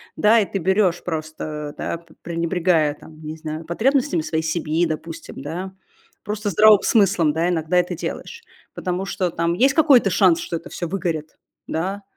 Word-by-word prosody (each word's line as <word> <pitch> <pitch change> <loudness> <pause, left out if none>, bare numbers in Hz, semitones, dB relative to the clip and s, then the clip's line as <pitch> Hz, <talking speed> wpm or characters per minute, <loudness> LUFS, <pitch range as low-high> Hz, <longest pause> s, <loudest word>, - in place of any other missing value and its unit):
да, 225 +2 +5
и 205 - +2
ты 195 - -1
берешь 190 0 +1
просто, 155 -2 -5
да, - - -3
п 170 -1 -20
пренебрегая, 170 -2 +1
там, 155 0 -15
не 155 +1 -6
знаю, 155 +1 -6
потребностями 220 - +1
своей 160 0 -2
семьи, 160 +1 0
допустим, 160 -2 -6
да, 180 +6 -5 0.5
просто 210 0 -3
здравым 210 +2 +6
смыслом, 190 -8 +3
да, 165 +2 +1
иногда 165 +1 0
это 180 0 +1
делаешь. 465 - -6 0.3
Потому 185 +1 -3
что, 190 -2 -1
там, 170 +1 0
есть 265 +8 +3
какой-то 275 -10 +5
шанс, 180 -4 +4
что 170 - -4
это 165 - -11
всё 175 - -4
выгорит, 165 -4 -3 0.3
да, 190 +5 -3
170 Hz, 170 wpm, -22 LUFS, 160-195 Hz, 0.5 s, здравым